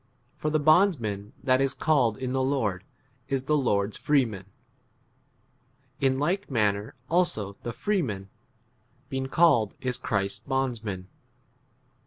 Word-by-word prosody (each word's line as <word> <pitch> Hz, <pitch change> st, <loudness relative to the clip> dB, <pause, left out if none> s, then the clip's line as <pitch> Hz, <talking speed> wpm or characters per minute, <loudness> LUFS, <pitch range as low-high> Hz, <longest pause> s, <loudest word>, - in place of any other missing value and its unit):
22 -, -, -29 dB
For 155 Hz, -, 0 dB
the 155 Hz, 0 st, +1 dB
bondsman 145 Hz, -, +2 dB
that 130 Hz, -1 st, +3 dB
is 135 Hz, 0 st, +1 dB
called 130 Hz, -9 st, +2 dB
in 130 Hz, -1 st, -3 dB
the 130 Hz, -, +1 dB
Lord 115 Hz, -9 st, 0 dB, 0.4 s
is 135 Hz, -1 st, -1 dB
the 150 Hz, +3 st, +1 dB
Lord's 105 Hz, -7 st, +1 dB
freeman; 115 Hz, -10 st, +1 dB, 1.5 s
in 135 Hz, -1 st, +2 dB
like 175 Hz, +8 st, -1 dB
manner 105 Hz, -4 st, 0 dB
also 155 Hz, -, +1 dB
the 120 Hz, -, -4 dB
freeman 115 Hz, -, -2 dB, 0.8 s
being 135 Hz, -2 st, -2 dB
23 -, -, -7 dB
called 120 Hz, -11 st, +4 dB
is 125 Hz, -1 st, -2 dB
Christ's 100 Hz, -5 st, -1 dB
bondsman. 115 Hz, -9 st, -2 dB
130 Hz, 130 wpm, -27 LUFS, 105-145 Hz, 1.5 s, called